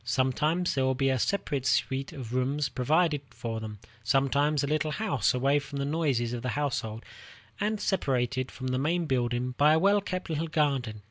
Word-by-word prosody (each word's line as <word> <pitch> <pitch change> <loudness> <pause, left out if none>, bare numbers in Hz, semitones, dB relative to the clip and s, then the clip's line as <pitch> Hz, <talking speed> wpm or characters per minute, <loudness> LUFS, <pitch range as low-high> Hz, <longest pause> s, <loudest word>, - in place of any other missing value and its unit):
Sometimes 150 +7 +1
there 135 - +1
will 130 0 +2
be 135 +1 +2
a 130 - 0
separate 145 -5 -1
suite 135 +2 0
of 130 -7 -7
rooms 135 +3 0
provided 155 +3 +1
for 115 -2 -5
them; 110 -1 -7 0.3
sometimes 140 +4 +2
a - - +2
little 155 +1 0
house 145 - +1
away 135 +3 +3
from 145 0 -7
the 140 - -1
noises 140 -6 0
of 120 - -3
the 125 - -2
household, 115 -6 -2 0.5
and 210 +1 0
separated 130 - 0
from 130 -1 -5
the 130 0 0
main 165 +5 0
building 125 -2 0
by 150 +2 +6
a 160 - +4
well 200 +3 +4
kept 185 -2 -4
little 160 0 -2
garden. 140 -8 0
140 Hz, 190 wpm, -28 LUFS, 125-155 Hz, 0.5 s, by